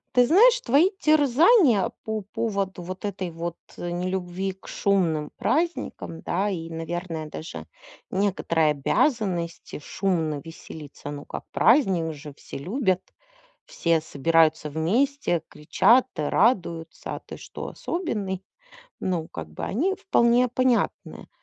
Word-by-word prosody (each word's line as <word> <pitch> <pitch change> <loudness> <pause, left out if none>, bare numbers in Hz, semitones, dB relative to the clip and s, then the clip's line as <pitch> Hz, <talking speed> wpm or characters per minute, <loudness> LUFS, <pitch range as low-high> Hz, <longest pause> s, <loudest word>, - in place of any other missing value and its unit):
Ты 245 0 +6
знаешь, 465 - +6
твои 350 - +4
терзания 300 - +4
по 220 -1 -3
поводу 200 -5 -2
вот 185 +3 -6
этой 190 -3 -3
вот, 170 +1 -5 0.2
э, 175 0 -4
нелюбви 185 +1 -2
к 190 - -18
шумным 165 -7 +1
праздникам, 295 - -1
да, 195 +4 -1
и, 165 -4 -4
наверное, 165 -1 -4
даже 160 - -8 0.4
некоторые 175 -5 +1
обязанности 175 - -1
шумно 160 -3 -1
веселиться- 150 -3 -9
ну 145 0 -7
как, - - -7
праздник 190 - +3
же, 145 0 -10
все - - -9
любят, 185 - 0 0.6
все 165 -2 +1
собираются 155 0 +2
вместе, 190 - +1
кричат 200 +12 +3
и - - -1
радуются. 170 - 0
А - - -6
ты - - -10
что, - - -8
особенный? 205 - -3 0.6
Ну 175 -4 -1
как 80 -1 -8
бы 80 - -7
они 340 - 0
вполне 240 -6 +3
понятны. 250 0 0
185 Hz, 125 wpm, -25 LUFS, 165-235 Hz, 0.6 s, Ты